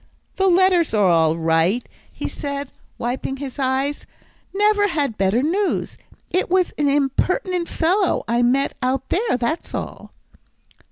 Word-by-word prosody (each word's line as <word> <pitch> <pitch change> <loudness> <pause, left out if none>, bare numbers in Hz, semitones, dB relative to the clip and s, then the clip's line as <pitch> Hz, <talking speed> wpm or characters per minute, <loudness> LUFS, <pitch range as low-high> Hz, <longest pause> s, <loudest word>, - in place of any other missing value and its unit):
"The 385 - +2
letters 360 -6 +3
are 205 -2 +4
all 160 -1 +3
right," 165 +8 +1 0.2
he - - -5
said, 280 -1 -5 0.3
wiping 255 +3 -3
his 275 0 -7
eyes, 270 +2 -1 0.4
"never 415 +1 +3
had 290 - -1
better 195 +6 +1
news. 380 +6 -1 0.4
It 370 - 0
was 370 0 +2
an 290 -1 +2
impertinent 335 +6 0
fellow 365 +3 +1
I 235 +1 +1
met 260 +3 +1
out 260 +1 -1
there, 415 - +1
that's 255 +7 -3
all." - - -6
280 Hz, 135 wpm, -21 LUFS, 245-365 Hz, 0.4 s, are